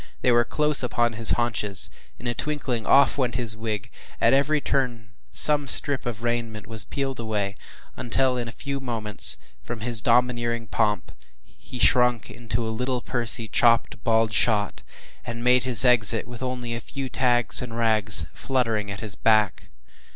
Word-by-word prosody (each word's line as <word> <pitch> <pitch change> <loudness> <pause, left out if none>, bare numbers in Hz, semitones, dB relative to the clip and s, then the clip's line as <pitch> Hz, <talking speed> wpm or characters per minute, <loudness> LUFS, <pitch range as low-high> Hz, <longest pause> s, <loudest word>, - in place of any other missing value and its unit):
They 125 - +3
were 120 0 +3
close 150 +4 -1
upon 120 -2 -1
his 115 0 +3
haunches; 110 -4 -2 0.3
in 120 - -13
a 120 - -1
twinkling 130 -6 -4
off 140 +1 +3
went 120 -3 -1
his 115 -2 +1
wig; 110 -1 -5 0.3
at - - +2
every 145 +3 +1
turn 120 -6 -3 0.2
some 145 -2 +5
strip 140 -1 +3
of 115 -1 -6
raiment 115 -3 -4
was 110 0 -1
peeled 135 -2 -5
away, 105 -3 -3 0.4
until 130 +2 0
in 120 -1 -4
a - - -7
few 140 +3 -6
moments, 110 -6 +3 0.2
from 115 -2 -8
his 115 -1 +2
domineering 120 -1 0
pomp, 105 -4 -2 0.3
he 125 - -13
shrunk 125 -2 +1
into 115 +1 -4
a 110 - -4
little, 125 +2 -3
pursy, 120 -2 -2
“chopp’d 115 0 +1
bald 115 -1 +1
shot,” 105 -2 0 0.4
and 115 0 -7
made 125 0 +3
his 125 -1 +6
exit 115 -3 +4
with 120 0 -11
only 125 -2 -5
a 115 - -5
few 135 +2 -7
tags 120 -2 +1
and 115 -2 -7
rags 110 -6 +4
fluttering 115 -6 -2
at 100 0 -7
his 110 -3 -3
back. 110 -2 0
120 Hz, 165 wpm, -23 LUFS, 110-125 Hz, 0.4 s, his